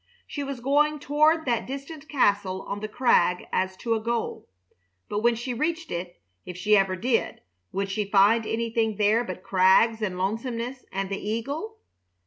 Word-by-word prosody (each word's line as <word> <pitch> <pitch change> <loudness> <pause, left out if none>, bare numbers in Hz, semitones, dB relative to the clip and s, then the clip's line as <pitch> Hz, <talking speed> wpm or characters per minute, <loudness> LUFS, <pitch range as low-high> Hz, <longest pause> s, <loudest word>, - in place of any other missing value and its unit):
She 285 - -5
was 275 -3 -5
going 295 +3 +2
toward 305 +3 +2
that 240 -3 0
distant 280 +3 -7
castle 200 -8 +1
on 200 - -5
the 215 - -4
crag 215 -6 +2
as 185 0 0
to 230 +3 -1
a 225 - 0
goal, 230 - -3 0.6
but 205 - -1
when 235 +2 +3
she 240 +2 -4
reached 325 +6 -2
it, 175 +1 -5 0.2
if 180 - -8
she 210 +3 +3
ever 195 -2 +2
did, 230 +5 -1 0.3
would 195 0 -2
she 205 0 -2
find 210 +3 +4
anything 225 -1 0
there 215 +3 +3
but 185 -4 -7
crags 195 +4 +4
and 190 -4 -2
lonesomeness 230 +6 -3
and 195 0 -3
the 195 - -2
eagle? 280 - -3
225 Hz, 170 wpm, -26 LUFS, 195-265 Hz, 0.6 s, find